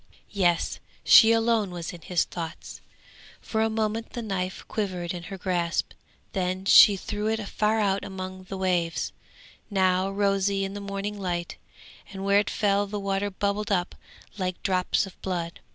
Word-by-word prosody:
Yes! 175 -4 +1 0.2
she 225 - +8
alone 225 -3 +2
was 175 -1 -6
in 170 - -10
his 180 0 +1
thoughts! 165 -2 -7 0.6
For 220 - -2
a 225 - +2
moment 220 0 -2
the 240 - -4
knife 190 -3 -3
quivered 185 -5 -3
in 175 - -5
her 195 - -6
grasp, 175 -2 -1 0.4
then 185 0 -2
she 200 +1 +8
threw 210 +2 -3
it 220 -2 -1
far 215 +2 +1
out 200 -2 +1
among 185 0 -7
the 195 +1 -6
waves, 175 -3 0 0.6
now 190 -1 +2
rosy 195 0 +1
in 195 - -5
the 205 - -6
morning 200 +1 -4
light, 175 -2 -3 0.5
and 195 0 -6
where 200 +1 +5
it 205 - -1
fell 205 -1 +1
the 205 +1 -4
water 195 0 -1
bubbled 200 +2 -2
up 180 -2 0 0.5
like 185 -1 -3
drops 185 +1 +1
of 195 - -14
blood. 170 -3 -3
195 Hz, 165 wpm, -26 LUFS, 185-205 Hz, 0.6 s, she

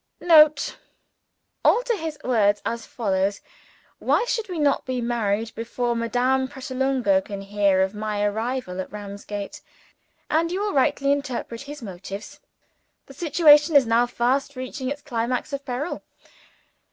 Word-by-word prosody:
[Note. 310 -3 +5 0.8
Alter 485 -1 +3
his 320 -5 -5
words 210 -5 +2
as 230 0 -3
follows: 195 -3 -1 0.6
"Why - - +2
should 450 -3 -2
we 360 - -4
not 290 -2 +2
be 255 -1 -3
married 225 -2 -1
before 235 +1 -2
Madame 250 +3 +1
Pratolungo 260 -6 0
can 200 +1 -7
hear 195 -1 +2
of 190 +1 -2
my 210 -1 -2
arrival 220 -2 -2
at - - -9
Ramsgate?" 205 0 -7 0.7
and 330 +2 +1
you 370 - -1
will 415 0 -1
rightly 275 +1 +2
interpret 260 -4 -3
his 290 -1 -9
motives. 195 0 -8 0.7
The 275 - -13
situation 300 0 +5
is 275 -3 +7
now 230 +2 +3
fast 265 +4 0
reaching 255 +1 -5
its 285 +1 -5
climax 250 +1 -2
of 280 0 -3
peril. 265 +7 -3
250 Hz, 140 wpm, -24 LUFS, 210-285 Hz, 0.8 s, is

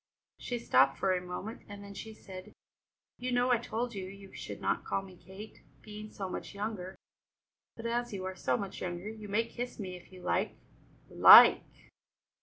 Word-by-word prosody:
She 245 - -3
stopped 135 - +3
for 190 - +1
a 180 - -1
moment, 180 +5 -6
and 205 0 -9
then 200 0 -10
she 220 +2 -8
said: 185 -3 -11 0.7
"You 250 +1 -3
know 245 +1 +2
I 240 - +4
told 235 +1 -3
you 190 -2 -5
you 195 0 -12
should - - -7
not - - -1
call 195 - -2
me 190 -1 -13
Kate, 190 +5 -12 0.2
being 215 0 -9
so 195 -2 -6
much 185 - -7
younger; 200 -3 -5 0.8
but, 230 - -9
as 240 +1 -1
you 190 -2 -5
are 190 0 -4
so 130 -8 0
much 195 -1 -6
younger, 175 +2 -4
you 215 -1 -9
may 220 +3 +1
kiss 245 +1 -6
me 185 -3 -5
if 180 - -14
you 185 -1 -13
like." 85 - 0 0.5
"Like!" - - +9
200 Hz, 190 wpm, -31 LUFS, 185-225 Hz, 0.8 s, Like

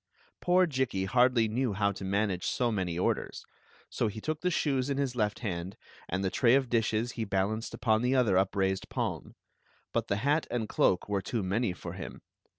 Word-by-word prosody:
Poor 180 +1 +4
Jikki 130 - -1
hardly 120 +2 +3
knew 120 +1 0
how 100 +1 +1
to 100 - -8
manage 95 -1 0
so 120 -2 +1
many 90 -5 -2
orders. 90 - -1 0.6
He 105 - -7
took 155 +6 -3
the 180 - +1
shoes 140 -6 0
in 140 - -1
his 135 -3 -1
left 105 -3 0
hand, 90 -3 -4 0.3
and 95 +2 -1
the 95 - 0
tray 120 0 +4
of 135 -2 +1
dishes 115 0 +1
he 115 - -3
balanced 100 +2 -1
upon 110 -2 +2
the 125 +2 +2
other 120 -7 +3
upraised 95 0 +1
palm. - - -3 0.6
But - - 0
the 100 - +1
hat 145 +7 +1
and 115 -3 -2
cloak 90 -2 +2
were 100 -1 0
too 110 +3 -2
many 100 +3 0
for 90 - -7
him. - - -8
110 Hz, 190 wpm, -30 LUFS, 95-125 Hz, 0.6 s, Poor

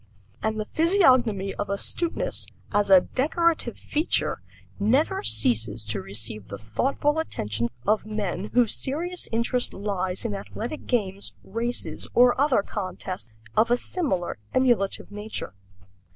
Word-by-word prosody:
And 220 0 -1
the 215 - -2
physiognomy 255 - +3
of 205 - -2
astuteness, 340 - -1 0.2
as 205 -1 +2
a 190 -2 +8
decorative 310 - 0
feature, 305 +3 0 0.4
never 245 +9 +2
ceases 110 0 +2
to 105 -2 -1
receive 105 +1 -3
the 100 - -6
thoughtful 270 - 0
attention 115 - -1 0.2
of 215 +1 +2
men 210 -1 -3
whose 240 -2 +4
serious 345 +7 -2
interest 235 +2 0
lies 190 -1 -2
in 220 - -1
athletic 225 +8 -6
games, 200 -5 -1
races, 235 +4 -2
or 245 0 +7
other 275 -8 +3
contests 185 - -5 0.3
of 230 - +4
a 240 - +4
similar 240 - -2 0.2
emulative 240 -8 +2
nature. 210 - -4
215 Hz, 125 wpm, -25 LUFS, 185-255 Hz, 0.4 s, a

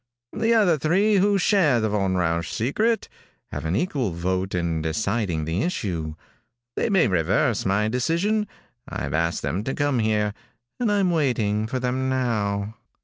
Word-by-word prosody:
"The 230 +1 +2
other 180 -8 +4
three 195 +8 +3
who 200 +1 +3
share 175 - +3
the 110 -1 0
Von 95 -3 0
Rausch 85 -2 0
secret 215 - 0 0.4
have - - -5
an 80 +3 0
equal 135 - 0
vote 95 +2 -2
in 85 -2 -1
deciding 85 0 -1
the 80 +5 -1
issue. 85 - -2 0.6
They - - 0
may 190 - +4
reverse 95 +5 +1
my 100 +2 +2
decision. 170 - 0 0.4
I've 70 +1 -4
asked 85 +1 0
them 95 +5 -2
to 135 - -3
come 145 -3 +1
here, 105 -1 +1 0.5
and 235 -4 +1
I'm 195 -3 +2
waiting 110 -9 +1
for 130 +3 -3
them 130 +1 -1
now." 110 -5 -1
110 Hz, 155 wpm, -24 LUFS, -, 0.6 s, other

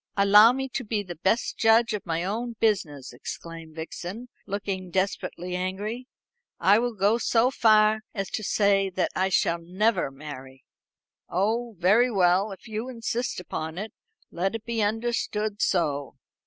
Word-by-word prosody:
"Allow 205 +3 +7
me 265 +1 -3
to 260 - -3
be 210 -2 -2
the 175 -3 -7
best 195 +8 0
judge 225 +1 +4
of 205 -3 -5
my 165 0 -1
own 230 +5 -3
business," 155 - 0
exclaimed 165 +5 -8
Vixen, 180 +8 -7 0.2
looking 195 -2 -4
desperately 180 -1 -2
angry. 205 +7 -4 0.5
"I 205 +3 +5
will 240 -1 -2
go 205 +4 +2
so 240 +2 +2
far 215 -3 +4
as 195 -3 -4
to 215 - -3
say 200 -1 +2
that 185 0 -1
I 190 - +2 0.3
never 190 +7 +1
shall - - -3
marry." 135 -2 -10 0.7
"Oh, 220 +5 -1
very 210 +8 +4
well, 190 -1 +2
if 195 - -11
you 220 +3 -4
insist 240 -1 -3
upon 160 -2 -5
it, 215 +3 -5 0.4
let 190 +5 -1
it 225 - -6
be 235 -1 -1
understood 215 -1 -1
so. 145 -6 0
205 Hz, 155 wpm, -26 LUFS, 180-225 Hz, 0.7 s, Allow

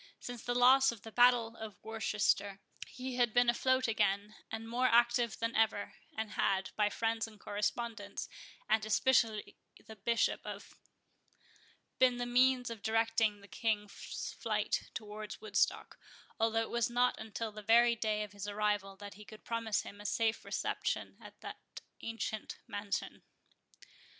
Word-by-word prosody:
Since 245 -2 -7
the 245 - -1
loss 260 +2 +6
of 230 -4 -11
the 225 - -9
battle 240 -1 +4
of 220 -2 -8
Worcester, 210 -2 0 0.3
he 255 -1 -6
had 240 -2 +2
been 245 0 +6
afloat 260 +1 +2
again, 205 -1 +1 0.2
and 225 0 -5
more 245 +2 +2
active 240 -1 +3
than 230 0 -2
ever; 220 -2 +1 0.2
and 220 -1 -3
had, 190 -2 0
by 210 -1 +3
friends 225 +1 -1
and 215 -2 -15
correspondents, 210 0 -3 0.4
and 220 0 +3
especially 220 -1 +2 0.3
the 220 - -10
Bishop 230 +3 +1
of - - -8 0.6
——, - - -31
been 250 -1 +5
the 245 - -2
means 250 0 +3
of 225 -3 -7
directing 225 -1 +1
the 200 - -14
King's 210 -2 -3
flight - - -1
towards 215 -1 -6
Woodstock, 435 - 0 0.4
although 225 0 +2
it - - -7
was 235 0 +1
not 245 +1 +2
until 220 0 -4
the 215 0 -8
very 235 +2 +5
day 215 -1 0
of 210 - -8
his 205 0 -7
arrival 205 -1 -1
that 205 +1 -9
he 210 - -12
could 215 +1 -14
promise 230 -2 -1
him 205 +1 -10
a - - -12
safe 225 -2 0
reception - - -2
at - - -13
that - - -7 0.4
ancient 225 -1 -4
mansion. 205 0 -4
225 Hz, 155 wpm, -33 LUFS, 210-240 Hz, 0.6 s, loss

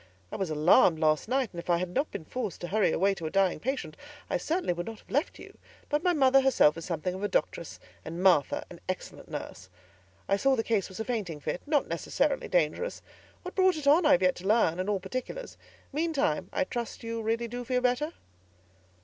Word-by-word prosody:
I - - -5
was 190 -3 -2
alarmed 155 +2 +5
last 155 +2 +2
night, 260 -1 +1
and 170 - -6
if 170 - -9
I 170 - +4
had 180 +1 -2
not 285 +3 0
been 160 - -7
forced 245 -1 -4
to 175 - -5
hurry 210 -3 +2
away 195 +4 +2
to 170 -5 -5
a - - -3
dying 190 -2 +2
patient, 240 - -3 0.4
I - - +2
certainly 330 - -1
would 175 0 -5
not 225 -1 -6
have - - -19
left 285 +4 0
you; - - -13 0.3
but 295 0 +1
my 360 - +3
mother 270 -4 +5
herself 260 - +4
is 165 - -7
something 175 +1 -2
of 190 - -6
a 205 - 0
doctress, 170 -3 -2 0.2
and 170 +3 -5
Martha 175 -7 +3
an - - -10
excellent - - -5
nurse. 90 +1 -7 0.6
I 195 - +2
saw 270 +5 +3
the 225 - -1
case 220 -5 0
was 190 - -10
a 220 - -2
fainting 200 -11 -3
fit, 150 +4 -3
not 295 -2 +2
necessarily - - -1
dangerous. - - 0 0.4
What 365 - -7
brought 375 -3 +3
it 300 - -6
on, 300 +3 +5
I - - +7
have 180 - +3
yet 185 - +4
to 185 - -6
learn, 200 -6 +3
and 185 +2 -1
all 200 -2 +1
particulars; 255 - -6 0.4
meantime, 300 -1 0
I - - +1
trust 240 -4 -5
you 230 0 -3
really 230 +2 -1
do 245 +2 -5
feel 250 +1 0
better?" 255 +6 0
220 Hz, 225 wpm, -29 LUFS, 175-270 Hz, 0.6 s, I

